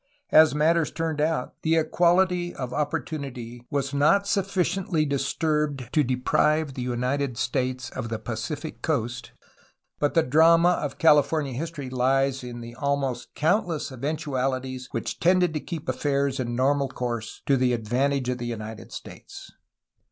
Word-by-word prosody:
As 155 Hz, -2 st, +7 dB
matters 160 Hz, +2 st, +3 dB
turned 160 Hz, -2 st, -2 dB
out, 155 Hz, -4 st, 0 dB
the 160 Hz, 0 st, +2 dB
equality 175 Hz, +2 st, +2 dB
of 125 Hz, -2 st, -5 dB
oppor 145 Hz, +2 st, -1 dB
tunity 125 Hz, -6 st, -6 dB
was 140 Hz, -1 st, -2 dB
not 150 Hz, +8 st, +4 dB
sufficiently 190 Hz, -4 st, 0 dB
disturbed 140 Hz, -1 st, -1 dB
to 150 Hz, -, +4 dB
deprive 135 Hz, +4 st, +1 dB
the 130 Hz, -, -5 dB
United 125 Hz, +1 st, -1 dB
States 130 Hz, 0 st, -2 dB
of 115 Hz, -, -5 dB
the 115 Hz, -, -2 dB
Pacific 120 Hz, +9 st, -5 dB
coast, 120 Hz, -6 st, -2 dB, 0.7 s
but 145 Hz, +2 st, 0 dB
the 165 Hz, -, +5 dB
drama 165 Hz, +5 st, +5 dB
of 145 Hz, -3 st, -4 dB
California 150 Hz, -3 st, +3 dB
his 155 Hz, +7 st, -3 dB
tory 140 Hz, -6 st, -7 dB
lies 135 Hz, +1 st, +1 dB
in 120 Hz, -1 st, -7 dB
the 120 Hz, 0 st, -9 dB
almost 140 Hz, -1 st, -2 dB
countless 165 Hz, -2 st, 0 dB
eventualities 130 Hz, -2 st, -2 dB
which -, -, -4 dB
tended 180 Hz, -1 st, +3 dB
to 155 Hz, -, -1 dB
keep 165 Hz, -1 st, -7 dB
affairs 140 Hz, +1 st, 0 dB
in 120 Hz, -2 st, -2 dB
normal 140 Hz, +2 st, +2 dB
course, 120 Hz, -3 st, -5 dB
to 140 Hz, -, +3 dB
the 130 Hz, -1 st, +2 dB
advantage 125 Hz, +4 st, 0 dB
of 125 Hz, 0 st, -1 dB
the 120 Hz, -, -4 dB
United 110 Hz, -2 st, -6 dB
States. -, -, -10 dB
140 Hz, 150 wpm, -25 LUFS, 125-160 Hz, 0.7 s, As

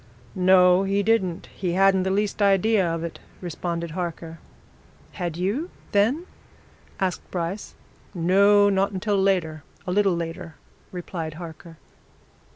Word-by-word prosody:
"No, 180 Hz, 0 st, +5 dB
he 195 Hz, +1 st, 0 dB
didn't 190 Hz, -6 st, +1 dB
he 180 Hz, -3 st, -2 dB
hadn't 195 Hz, 0 st, +4 dB
the 190 Hz, -, -1 dB
least 205 Hz, +2 st, -1 dB
idea 200 Hz, +1 st, +3 dB
of 165 Hz, 0 st, -3 dB
it," 170 Hz, -, -6 dB, 0.2 s
responded 170 Hz, -1 st, -4 dB
Harker. 165 Hz, -1 st, -5 dB, 0.7 s
"Had 170 Hz, -2 st, -4 dB
you 210 Hz, -, -1 dB, 0.2 s
then?" 240 Hz, -, +2 dB, 0.7 s
asked 185 Hz, -2 st, -2 dB
Bryce. 180 Hz, +3 st, -4 dB, 0.4 s
"No 200 Hz, +4 st, +5 dB
not 195 Hz, 0 st, +2 dB
until 195 Hz, +1 st, 0 dB
later 170 Hz, -6 st, 0 dB, 0.2 s
a 180 Hz, -, -3 dB
little 195 Hz, -1 st, +2 dB
later," 170 Hz, -1 st, -6 dB, 0.4 s
replied 170 Hz, -3 st, -5 dB
Harker. 165 Hz, 0 st, -10 dB
185 Hz, 125 wpm, -24 LUFS, 170-200 Hz, 0.7 s, No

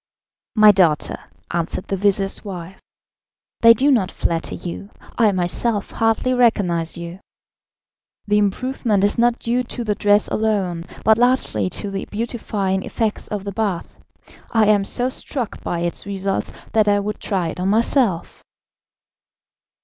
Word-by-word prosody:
"My 215 Hz, -1 st, +8 dB
daughter," 175 Hz, -6 st, +1 dB, 0.3 s
answered 170 Hz, +1 st, -3 dB
the 195 Hz, -, 0 dB
vizir's 195 Hz, 0 st, 0 dB
wife, 190 Hz, -2 st, -8 dB, 0.8 s
"they 230 Hz, 0 st, +7 dB
do 280 Hz, +4 st, +3 dB
not 210 Hz, -8 st, +2 dB
flatter 165 Hz, -3 st, -1 dB
you. 180 Hz, +3 st, -7 dB, 0.3 s
I 220 Hz, -3 st, +4 dB
myself 195 Hz, +4 st, -1 dB
hardly 225 Hz, +3 st, +1 dB
recognised 190 Hz, -10 st, +1 dB
you. 170 Hz, +2 st, -7 dB, 1.1 s
The 210 Hz, 0 st, +2 dB
improvement 210 Hz, 0 st, 0 dB
is 205 Hz, +3 st, +2 dB
not 240 Hz, 0 st, +3 dB
due 240 Hz, +2 st, 0 dB
to 240 Hz, 0 st, -5 dB
the 215 Hz, -2 st, 0 dB
dress 205 Hz, 0 st, +3 dB
alone, 195 Hz, -6 st, -1 dB, 0.2 s
but 220 Hz, +1 st, +5 dB
largely 240 Hz, -, +1 dB
to 200 Hz, -, -5 dB
the 195 Hz, 0 st, -4 dB
beautifying 210 Hz, -4 st, -2 dB
effects 220 Hz, +2 st, -3 dB
of 205 Hz, -2 st, -4 dB
the 200 Hz, -, -4 dB
bath. 200 Hz, -4 st, -3 dB, 0.5 s
I 225 Hz, -2 st, +4 dB
am 205 Hz, -1 st, +3 dB
so 245 Hz, +4 st, +2 dB
struck 255 Hz, -2 st, -4 dB
by 170 Hz, -, -2 dB
its 175 Hz, +2 st, -4 dB
results, 195 Hz, -1 st, -2 dB, 0.2 s
that 215 Hz, -1 st, +3 dB
I 205 Hz, 0 st, +4 dB
would 210 Hz, +1 st, -4 dB
try 185 Hz, -5 st, -1 dB
it 170 Hz, -, -7 dB
on 185 Hz, -, -1 dB
myself." 220 Hz, -3 st, +1 dB
205 Hz, 145 wpm, -20 LUFS, 185-225 Hz, 1.1 s, My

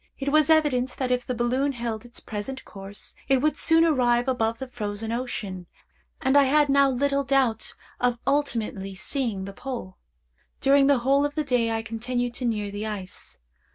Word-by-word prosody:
It 280 Hz, 0 st, -2 dB
was 310 Hz, 0 st, +4 dB
evident 285 Hz, -6 st, +2 dB
that 255 Hz, -2 st, -1 dB
if 250 Hz, -1 st, 0 dB
the 250 Hz, -, -2 dB
balloon 255 Hz, +4 st, 0 dB
held 235 Hz, -2 st, -4 dB
its 240 Hz, -, -10 dB
present 220 Hz, +5 st, -6 dB
course, 195 Hz, 0 st, -9 dB
it 270 Hz, 0 st, +4 dB
would 305 Hz, +3 st, +1 dB
soon 325 Hz, 0 st, +4 dB
arrive 245 Hz, -6 st, +2 dB
above 230 Hz, -3 st, 0 dB
the 265 Hz, -, -6 dB
Frozen 220 Hz, -2 st, -4 dB
Ocean, 205 Hz, -7 st, -4 dB, 0.5 s
and 265 Hz, -2 st, +1 dB
I 285 Hz, -1 st, +7 dB
had 295 Hz, +2 st, +3 dB
now 275 Hz, 0 st, +5 dB
little 280 Hz, +2 st, +1 dB
doubt 260 Hz, -5 st, +1 dB, 0.2 s
of 245 Hz, -1 st, +1 dB
ultimately 225 Hz, -9 st, -1 dB
seeing 215 Hz, -2 st, -3 dB
the 195 Hz, -, -7 dB
Pole. 235 Hz, -6 st, -6 dB, 0.6 s
During 275 Hz, 0 st, +5 dB
the 280 Hz, -1 st, +5 dB
whole 275 Hz, +1 st, +4 dB
of 290 Hz, 0 st, -2 dB
the 305 Hz, -, 0 dB
day 245 Hz, -5 st, +1 dB
I 225 Hz, 0 st, -1 dB
continued 240 Hz, +2 st, -2 dB
to 250 Hz, -, -4 dB
near 210 Hz, -3 st, -1 dB
the 205 Hz, +2 st, -4 dB
ice. 195 Hz, -4 st, -7 dB
250 Hz, 185 wpm, -25 LUFS, 225-275 Hz, 0.6 s, I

